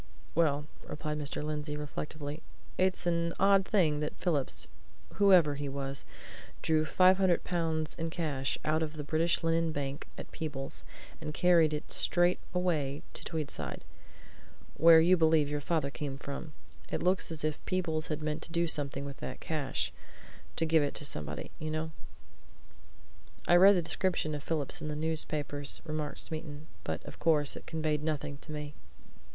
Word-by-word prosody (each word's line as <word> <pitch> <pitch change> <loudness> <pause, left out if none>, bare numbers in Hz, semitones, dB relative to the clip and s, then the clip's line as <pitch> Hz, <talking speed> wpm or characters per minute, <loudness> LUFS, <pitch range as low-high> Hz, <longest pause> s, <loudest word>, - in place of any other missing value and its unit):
"Well," 150 -3 +2 0.2
replied 150 0 -4
Mr. 145 0 -2
Lindsey, 150 -1 -3
reflectively, 150 +1 -5 0.3
"it's 185 -1 +1
an 170 -1 +1
odd 195 0 +5
thing 165 -8 +2
that 150 0 -3
Phillips, 150 -7 0 0.5
whoever 185 -7 +6
he 145 0 -4
was, 135 0 -4 0.6
drew 155 -1 +2
five 185 +3 +5
hundred 185 -3 +3
pounds 160 -3 -1
in 165 0 -3
cash 150 -6 -1
out 155 +1 +2
of 155 -1 -2
the 155 -1 -5
British 160 +4 +1
Linen 165 0 +2
Bank 140 0 -4
at - - -8
Peebles, 140 -4 -4 0.4
and 150 -1 -5
carried 170 -3 +5
it 150 0 -4
straight 175 +1 +3
away 155 -6 -1
to - - -2
Tweedside 140 - -4 0.9
where 165 0 +8
you 180 +3 +5
believe 160 -2 +4
your 145 0 -2
father 150 -2 0
came 140 -2 -5
from. 140 +2 -7 0.4
It - - -1
looks 180 -1 +2
as 160 -2 -2
if 155 -1 0
Phillips 165 -4 0
had 155 -1 -3
meant 155 +1 -2
to - - -7
do 170 0 +1
something 140 -3 -1
with 140 -1 -7
that 130 - -6
cash 145 -5 -2 0.6
to 165 - +1
give 160 0 +4
it 145 - -1
to 145 - +1
somebody, 75 - -1
you 155 -1 -4
know." 155 +1 -2 1.6
"I 175 - +6
read 195 +3 +8
the 175 - +1
description 165 -2 0
of 145 - -4
Phillips 150 -3 -1
in - - -4
the 150 - -3
newspapers," 150 -2 +2
remarked 155 -2 -3
Smeaton. 155 -1 -2 0.2
"But, - - -4
of - - -10
course, 150 -2 +3
it - - -10
conveyed 155 -2 -1
nothing 145 -2 -2
to 155 - -9
me." 150 -1 -5
155 Hz, 165 wpm, -31 LUFS, 145-165 Hz, 1.6 s, where